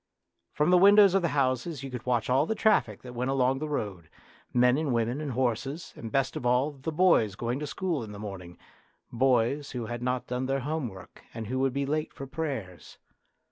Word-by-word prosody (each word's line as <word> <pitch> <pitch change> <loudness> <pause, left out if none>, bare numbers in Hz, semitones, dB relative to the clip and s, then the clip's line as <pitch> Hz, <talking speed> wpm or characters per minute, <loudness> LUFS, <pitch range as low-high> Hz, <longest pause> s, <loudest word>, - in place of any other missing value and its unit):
From 150 +4 +1
the 180 - +6
windows 200 0 +7
of 195 - +3
the 170 - +1
houses 135 +2 0
you 135 - -6
could 125 -1 -7
watch 120 -3 +1
all 135 +5 +2
the 220 - -1
traffic 210 - +2
that 125 -1 -9
went 125 +2 -2
along 135 0 +2
the 155 +1 -4
road, 95 - -4 0.4
men 125 0 +4
and 150 -1 -1
women 120 +5 -1
and 145 -4 -3
horses, 130 +6 -2
and 115 -1 -8
best 135 -1 0
of - - -4
all, 125 +4 +2
the 140 +2 -5
boys 155 - +3
going 120 +5 -2
to 150 - -4
school 170 -4 -2
in 105 - -8
the 105 - -8
morning 95 -4 -8 0.5
boys 130 +3 +1
who 120 -3 -3
had 120 +1 -5
not 125 0 -1
done 125 +1 -3
their 135 0 0
homework 125 - -5
and 115 -1 -5
who 130 +5 -2
would 135 0 +2
be 140 +1 -1
late 155 +2 -2
for 135 - -7
prayers. 130 - -5
130 Hz, 215 wpm, -28 LUFS, 120-150 Hz, 0.5 s, windows